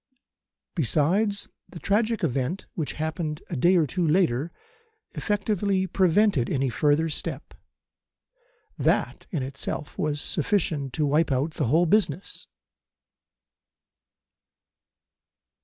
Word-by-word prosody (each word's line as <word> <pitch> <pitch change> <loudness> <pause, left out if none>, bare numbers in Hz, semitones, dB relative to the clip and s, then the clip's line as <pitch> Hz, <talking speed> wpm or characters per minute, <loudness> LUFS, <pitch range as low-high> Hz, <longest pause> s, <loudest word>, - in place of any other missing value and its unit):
Besides, 185 - +1 0.2
the - - -10
tragic 215 +3 0
event 140 +4 -1
which 155 -4 -3
happened 155 0 -3
a - - -1
day 175 +9 +4
or 165 -3 +4
two 180 +5 -2
later 155 -3 +2 0.6
effectively 200 -2 0
prevented 185 - +2
any 135 -1 0
further 150 +5 +2
step. 155 -2 -5 1.3
That - - 0
in 155 -8 -2
itself 140 +2 -5
was 150 -1 0
sufficient 155 -4 0
to 155 - +1
wipe 150 +2 +2
out 140 +5 0
the 145 - -1
whole 160 +8 +4
business. 185 -2 0
160 Hz, 105 wpm, -26 LUFS, 145-190 Hz, 1.3 s, day